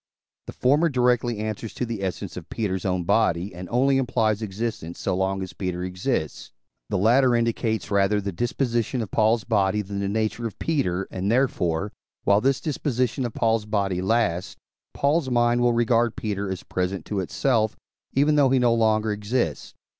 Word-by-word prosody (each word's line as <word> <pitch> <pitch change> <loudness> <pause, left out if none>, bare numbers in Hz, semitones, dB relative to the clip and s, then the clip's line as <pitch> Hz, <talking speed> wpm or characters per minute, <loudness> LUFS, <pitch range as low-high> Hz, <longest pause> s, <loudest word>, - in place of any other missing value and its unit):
The - - -7
former 145 +6 +3
directly 125 -3 +1
answers 110 +1 -4
to 125 - -2
the 115 -4 -5
essence 95 0 -4
of 85 -2 -8
Peter's 95 -5 -2
own 90 -2 0
body, 90 -1 +1
and 90 0 -8
only 135 +3 +3
implies 115 -4 +1
existence 105 -5 -4
so - - -1
long 95 +1 -1
as 95 -1 -8
Peter 90 -2 -3
exists; 90 - -3 0.4
the - - 0
latter 120 +5 +4
indicates 115 -3 -1
rather 100 +1 +3
the 100 0 -3
disposition 120 +2 -1
of 105 - -9
Paul's 110 0 +2
body 105 -2 +1
than 100 0 -5
the 100 0 -1
nature 110 +2 -1
of 110 - -10
Peter, 95 - -1
and, 95 +3 -1
therefore, 100 -7 +1 0.3
while 100 +1 +4
this 135 +2 +2
disposition 130 -4 -1
of 115 - -11
Paul's 110 -2 +1
body 100 -4 0
lasts, 95 -4 0 0.4
Paul's 145 0 +1
mind 120 0 +2
will 120 0 +4
regard 115 0 +2
Peter 100 -2 -3
as 95 -2 -4
present 90 +1 -3
to 105 - -2
itself, 110 +3 0 0.4
even 145 +3 +3
though 145 -3 +4
he 135 - +3
no 120 -2 +3
longer 110 -1 +2
exists. 105 - -2
110 Hz, 175 wpm, -24 LUFS, 95-120 Hz, 0.4 s, latter